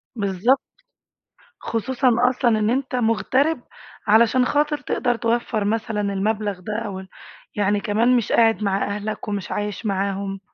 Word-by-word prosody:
بالضبط. 205 +5 +1 1.0
خصوصًا 255 +4 0 0.2
أصلًا 240 -3 +1
إن 210 0 +1
أنت 255 +1 -1
مُغترِب 250 +5 +1 0.5
علشان 230 +4 +5
خاطر 295 +2 +1
تقدر 245 -3 -1
توفّر 230 -2 -1
مثلًا 220 0 -1
المبلغ 205 0 -1
ده 195 +4 -5
أوال 190 -2 -6 0.5
يعني 205 0 +1
كمان 230 +4 +2
مش 235 - -2
قاعد 225 -2 +3
مع 195 -1 +1
أهلك 210 +1 -5
ومش 205 -2 -4
عايش 210 +2 -3
معاهم. 195 0 -2
215 Hz, 130 wpm, -22 LUFS, 200-240 Hz, 1.0 s, علشان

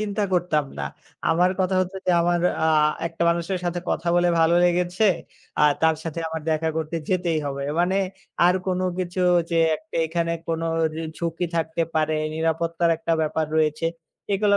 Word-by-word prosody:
চিন্তা 210 -1 -2
করতাম 170 -4 +1
না। 70 - -2 0.4
আমার 175 +3 +3
কথা 185 0 +1
হচ্ছে 185 +1 -3
যে - - +4
আমার 175 0 +2 0.2
আ - - +4 0.4
একটা 165 0 -4
মানুষের 170 +2 -1
সাথে 175 0 -1
কথা 170 - -2
বলে 175 0 +3
ভালো 165 +1 +4
লেগেছে, 180 +3 +1 0.5
আ - - +3 0.2
তার 160 0 +5
সাথে 165 0 -4
আমার 160 0 -4
দেখা 160 +1 +1
করতে 160 +1 -2
যেতেই 175 -3 +1
হবে, 140 0 -3 0.2
মানে 180 +2 +2 0.5
আর 180 - +4
কোনো 185 0 0
কিছু 180 0 -2 0.3
যে 170 - 0 0.2
একটা 210 +6 -9
এখানে 170 +1 -1 0.2
কোনোর 165 0 -1 0.4
ঝুঁকি 170 +1 -2
থাকতে 160 0 0
পারে, 155 0 +1 0.2
নিরাপত্তার 165 +1 0
একটা 165 +1 -2
ব্যাপার 155 0 0
রয়েছে, 155 +1 +1 0.5
এগুলা 200 0 +3
170 Hz, 165 wpm, -24 LUFS, 160-180 Hz, 0.5 s, তার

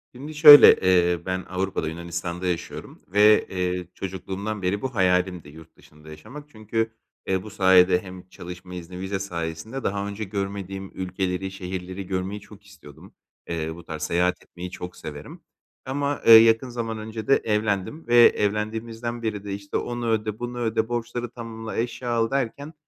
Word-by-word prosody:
Şimdi 150 +4 -8
şöyle, 150 -1 +10 0.4
ııı, 85 -1 -6
ben 95 0 -3
Avrupa’da, 95 -3 -2
Yunanistan’da 85 +2 -5
yaşıyorum. 85 -2 -5
Ve, 105 +1 +5
eee, 90 -1 -2
çocukluğumdan 95 +2 -5
beri 95 +2 -1
bu 130 -2 -4
hayalimdi 90 -4 +1
yurt 80 +2 -15
dışında 75 +1 -17
yaşamak. 110 - -11
Çünkü, 110 0 -2 0.4
ııı, 95 -1 0
bu 110 - -9
sayede 95 -2 +4
hem 90 -1 -11
çalışma 90 0 -10
izni, 90 +1 -8
vize 95 +1 -3
sayesinde 85 +6 -5
daha 100 0 -2
önce 100 +2 -5
görmediğim 95 -1 -5
ülkeleri, 95 0 -3
şehirleri 95 0 -6
görmeyi 95 +2 -3
çok 105 0 -16
istiyordum. 90 -8 -15 0.4
Iıı, 80 -1 -3
bu 85 - -12
tarz 80 -2 -6
seyahat 90 +2 0
etmeyi 90 0 -9
çok 90 -1 -8
severim. 75 -1 -9 0.4
Ama, 140 +2 -2
ııı, 115 -1 +12
yakın 115 +2 +3
zaman 115 -2 -4
önce 110 0 -7
de 135 - +6
evlendim 105 - -1
ve 120 - +2
evlendiğimizden 115 +2 +2
beri 105 -3 -3
de, 100 -1 -5
işte, 100 0 -4
onu 120 -1 -3
öde, 110 -1 -1
bunu 120 0 -5
öde, 110 -1 0
borçları 120 0 -3
tamamla, 115 -1 -7
eşya 120 +1 -3
al 115 0 +1
derken 140 +3 -3
100 Hz, 160 wpm, -24 LUFS, 90-115 Hz, 0.4 s, ııı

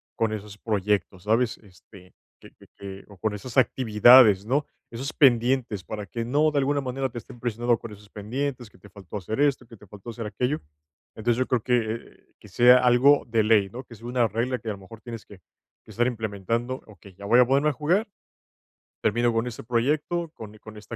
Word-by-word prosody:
con 110 -1 0
esos 105 -1 -7
proyectos, 100 -4 -1
¿sabes?, 115 +3 +1
este, 90 -2 -18 0.3
que - - -15
que - - -21
que 95 0 -9
o 100 -2 -15
con 110 +2 -2
esas 115 +5 -8
actividades, 110 -3 +6
¿no?, 140 +5 0 0.3
esos 130 +6 -5
pendientes, 120 - +2
para 105 -1 -6
que 115 +3 -5
no, 150 +5 +2
de 145 - +1
alguna 140 +1 0
manera, 130 +1 -3
te 120 - -10
estén 120 - -10
presionando 120 0 0
con 115 - -9
esos 105 0 -16
pendientes, 120 +3 -4
que - - -22
te 105 - -17
faltó 100 +1 -9
hacer 110 +6 -5
esto, 140 -3 +1
que 115 0 -15
te 105 - -17
faltó 105 +4 -11
hacer 115 0 -6
aquello. 125 +7 -2 0.5
Entonces, 115 +2 0
yo 130 - 0
creo 125 -3 +1
que 115 -2 -3
que - - -15
sea 125 +1 +6
algo 125 +3 +4
de 115 -2 +1
ley, 105 -3 +3
¿no?, 125 +5 -8
que 115 - -14
sea 115 +3 -14
una 120 -1 +1
regla 120 +4 -2
que, 115 - -6
a - - 0
lo - - -10
mejor 110 +4 -13
tienes 115 -3 -9
que 100 -3 -15 0.4
que - - -22
estar 120 +1 +1
implementando. 115 +2 -3
Okey, 100 -2 -16
ya 100 - -11
voy 120 +5 +5
a 125 - +7
ponerme 140 +4 +2
a - - -2
jugar, 180 - 0 1.0
termino 120 0 +2
con 115 +1 0
este 120 - -7
proyecto, 150 +8 -1
con 110 -1 -11
e - - -17
con 110 0 -12
esta 110 +2 -9
115 Hz, 215 wpm, -25 LUFS, 105-125 Hz, 1.0 s, a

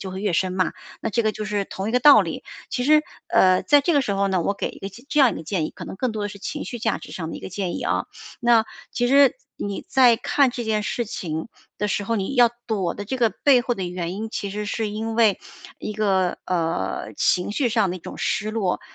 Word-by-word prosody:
就 190 - -6
会 190 - -6
越 205 - 0
深 185 +2 +1
嘛， 185 -1 +1 0.3
那 225 - -1
这 235 +2 +1
个 215 - +1
就 215 - -5
是 205 -1 -1
同 195 +2 -4
一 - - -5
个 250 - +3
道 290 +3 +8
理。 - - -6 0.3
其 250 - -1
实， 305 +3 +5 0.3
呃， 185 -1 +4
在 290 -1 +5
这 340 - +2
个 285 - +4
时 215 -7 -1
候 200 0 +1
呢， 190 -2 +1
我 200 - 0
给 - - -3
一 - - -14
个 195 - -5
这 275 +9 -2
样 260 -3 +6
一 - - -5
个 - - -6
建 160 -1 -1
议， - - -7
可 - - -9
能 - - -7
更 245 +2 -1
多 215 -1 -3
的 205 - -2
是 200 - -10
情 295 +9 -5
绪 240 - -6
价 220 -2 0
值 - - -11
上 165 -2 -5
的 - - -6
一 - - -9
个 - - -7
建 185 -1 -3
议 - - -5
啊， - - 0 0.3
那 235 -2 +4 0.3
其 245 0 0
实 275 - +5 0.2
你 200 -1 -4
在 250 -4 +5
看 280 +2 +2
这 240 -1 -5
件 215 -1 0
事 235 +3 -2
情 160 -3 -5 0.3
的 210 - 0
时 205 0 -1
候， 230 +2 0
你 195 +7 -2
要 240 -2 +6 0.2
躲 195 -6 -1
的 205 - -6
这 260 +6 -3
个 230 -2 +4
背 265 -4 +4
后 245 0 -1
的 190 - -4
原 175 0 -4
因， 220 +2 -5
其 200 - -3
实 210 +2 -4
是 215 +1 -2
因 220 +2 -4
为 220 -4 +4 0.4
一 215 - -5
个， 195 -4 +1
呃， 170 -1 -2
情 180 +3 +2
绪 250 +2 +1
上 220 -4 +2
的 180 - -3
一 - - -9
种 - - -9
失 215 0 -1
落， 210 -5 -1
210 Hz, 290 characters per minute, -23 LUFS, 190-240 Hz, 0.4 s, 道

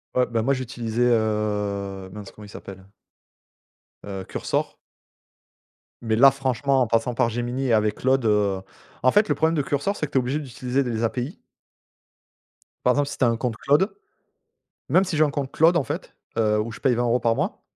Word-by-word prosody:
Ouais 125 0 +3
bah 115 -2 -1
moi 140 - +2
j'utilisais, 120 -3 -3
heu, 105 -3 -1
mince 105 -1 -8
comment 105 - -13
il - - -13
s'appelle 95 -1 -10 1.2
heu, 95 -2 -6
Cursor - - -2 1.3
mais 110 -2 0
là, 135 +4 +7
franchement, 135 0 0
en 120 - +2
passant 115 +2 +1
par 115 0 +1
Gemini, 120 +3 -2
et 115 - +2
avec 105 -1 +2
Claude, 130 -1 +1
heu 100 -3 +2 0.4
en 130 - +6
fait, 210 +1 +4
le - - +1
problème 160 +1 +1
de 145 - +2
Cursor, 145 +9 -1
c'est 150 - -1
que - - -23
tu - - +2
es - - +6
obligé 130 +5 -2
d'utiliser 130 -1 -2
des 115 -2 -2
API 125 - -2 1.5
par 125 - +5
exemple, 145 0 +1
si - - -6
tu - - 0
as - - +5
un 115 -1 +1
compte 115 -3 -3
Claude. 165 - +2 0.9
Même 185 - +5
si 180 -5 -3
j'ai 155 - +5
un 150 - +2
compte 140 -2 -4
Claude, 165 +4 +4
en 145 - +1
fait. - - -6 0.2
Heu, 105 -1 +2
où 115 +2 -3
je 115 - -10
paye 130 -4 +2
20 120 - 0
euros 120 +1 +2
par 115 0 +1
mois - - -2
120 Hz, 205 wpm, -24 LUFS, 110-135 Hz, 1.5 s, là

